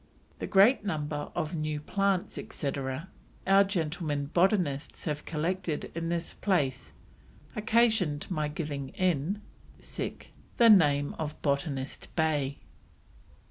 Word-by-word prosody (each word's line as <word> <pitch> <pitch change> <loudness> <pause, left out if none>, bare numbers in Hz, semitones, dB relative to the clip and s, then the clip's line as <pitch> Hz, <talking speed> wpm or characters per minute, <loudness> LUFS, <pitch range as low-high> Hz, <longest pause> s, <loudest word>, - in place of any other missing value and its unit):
"The - - -3
great 205 +5 +5
number 150 -5 -3
of 170 0 -2
New 155 -1 -2
Plants, 195 +3 0
etc., 140 +3 -4 0.4
our 195 +1 +6
Gentlemen 155 -6 -2
Botanists 175 -6 +1
have 150 -2 -3
collected 165 0 -2
in 165 0 -3
this 170 -1 -2
place 135 - 0 0.6
occasion'd 215 -8 +2
my 155 -4 0
giving 150 -3 -4
in 185 +3 0 0.3
the 235 -1 -1
Name 145 -7 +5
of 155 -1 -4
Botanist 140 -1 -2
Bay." 145 -4 0
155 Hz, 105 wpm, -29 LUFS, 145-185 Hz, 0.6 s, our